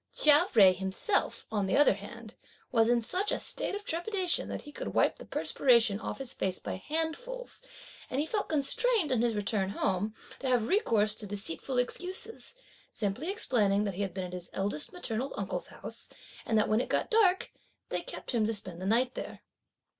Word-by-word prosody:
Chia 300 Hz, +4 st, +6 dB
Jui 195 Hz, -5 st, +7 dB
himself, 190 Hz, -, -1 dB
on 205 Hz, -3 st, 0 dB
the -, -, +2 dB
other 290 Hz, -5 st, +6 dB
hand, 215 Hz, +3 st, -10 dB, 0.4 s
was 225 Hz, -2 st, +4 dB
(in 240 Hz, -1 st, +3 dB
such 380 Hz, -, 0 dB
a -, -, 0 dB
state -, -, -2 dB
of 410 Hz, 0 st, -6 dB
trepidation) 360 Hz, +1 st, 0 dB
that -, -, -5 dB
he 295 Hz, -, -10 dB
could -, -, -6 dB
wipe -, -, +3 dB
the -, -, -11 dB
perspiration 235 Hz, -6 st, +3 dB
(off -, -, -5 dB
his 270 Hz, -1 st, -2 dB
face) 185 Hz, -1 st, -1 dB
by -, -, -5 dB
handfuls; 325 Hz, -, -3 dB, 0.5 s
and 260 Hz, -, -1 dB
he 295 Hz, -, +1 dB
felt 410 Hz, +5 st, -2 dB
constrained 335 Hz, -, +2 dB
on 245 Hz, -3 st, +2 dB
his 235 Hz, -2 st, +1 dB
return 205 Hz, -2 st, 0 dB
home, 200 Hz, +2 st, -1 dB, 0.2 s
to 270 Hz, -, -3 dB
have 240 Hz, -3 st, +2 dB
recourse 225 Hz, -, +2 dB
to 210 Hz, -1 st, -4 dB
deceitful 205 Hz, -, -2 dB
excuses, 370 Hz, -, 0 dB, 0.4 s
simply 215 Hz, -, -2 dB
explaining 215 Hz, -, +2 dB
that 200 Hz, -2 st, -2 dB
he 190 Hz, -, -4 dB
had 190 Hz, -3 st, -3 dB
been 190 Hz, -1 st, -3 dB
at 180 Hz, -, -8 dB
his 180 Hz, -1 st, -7 dB
eldest 195 Hz, -6 st, -2 dB
maternal 265 Hz, -6 st, -3 dB
uncle's -, -, -3 dB
house, -, -, -8 dB, 0.4 s
and 220 Hz, -, +2 dB
that 215 Hz, -, +3 dB
when 215 Hz, +2 st, +2 dB
it -, -, -5 dB
got -, -, 0 dB
dark, 395 Hz, -5 st, +3 dB, 0.4 s
they -, -, -1 dB
kept -, -, -7 dB
him 235 Hz, -4 st, +1 dB
to 225 Hz, -, 0 dB
spend 185 Hz, -3 st, -4 dB
the 190 Hz, -, -3 dB
night 245 Hz, +4 st, +3 dB
there. -, -, -7 dB
235 Hz, 195 wpm, -30 LUFS, 205-325 Hz, 0.5 s, Jui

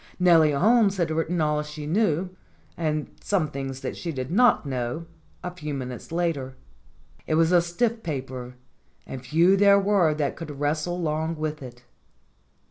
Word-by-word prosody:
Nellie 165 Hz, -4 st, +5 dB
Holmes 205 Hz, +5 st, +3 dB
had 170 Hz, -3 st, 0 dB
writ 160 Hz, +1 st, 0 dB
ten 175 Hz, +1 st, -1 dB
all 150 Hz, -1 st, +1 dB
she 150 Hz, 0 st, -7 dB
knew, 180 Hz, 0 st, +1 dB, 0.4 s
and 155 Hz, -2 st, -2 dB
some 180 Hz, -7 st, 0 dB
things 135 Hz, -1 st, -5 dB
that -, -, -4 dB
she 170 Hz, -, -4 dB
did 130 Hz, -2 st, -5 dB
not 240 Hz, -2 st, +4 dB
know, 130 Hz, +3 st, -3 dB, 0.4 s
a 180 Hz, -, -4 dB
few 150 Hz, -5 st, -5 dB
minutes 125 Hz, +2 st, -7 dB
later. 165 Hz, -6 st, -2 dB, 0.7 s
It 155 Hz, -, +1 dB
was 165 Hz, +1 st, +3 dB
a 175 Hz, -1 st, +6 dB
stiff 225 Hz, +7 st, -1 dB
paper, 130 Hz, -, -5 dB, 0.5 s
and 130 Hz, -1 st, -8 dB
few 165 Hz, +9 st, +4 dB
there 200 Hz, 0 st, +6 dB
were 195 Hz, -6 st, +2 dB
that 145 Hz, -3 st, -1 dB
could 150 Hz, -4 st, -8 dB
wrestle 155 Hz, +4 st, -1 dB
long 160 Hz, 0 st, -1 dB
with 155 Hz, -1 st, -4 dB
it. 125 Hz, -1 st, -11 dB
155 Hz, 165 wpm, -25 LUFS, 140-175 Hz, 0.7 s, a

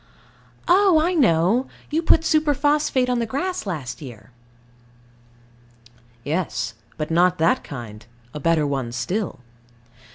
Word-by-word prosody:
Oh, 370 Hz, -2 st, +5 dB
I 340 Hz, +4 st, +1 dB
know: 225 Hz, -, +3 dB, 0.2 s
you 315 Hz, +2 st, +1 dB
put 325 Hz, -1 st, +4 dB
superphosphate 295 Hz, -4 st, +1 dB
on 250 Hz, -1 st, 0 dB
the 230 Hz, -, -1 dB
grass 360 Hz, -, -3 dB
last 155 Hz, -6 st, -5 dB
year. 125 Hz, -3 st, -11 dB, 1.9 s
Yes. 140 Hz, -, -2 dB, 0.2 s
But 155 Hz, +1 st, -4 dB
not 180 Hz, +2 st, +3 dB
that 165 Hz, 0 st, +2 dB
kind; 115 Hz, -6 st, -9 dB, 0.3 s
a 150 Hz, -, -5 dB
better 160 Hz, 0 st, +2 dB
one 135 Hz, -4 st, -2 dB
still. 185 Hz, -, -3 dB
180 Hz, 120 wpm, -22 LUFS, -, 1.9 s, Oh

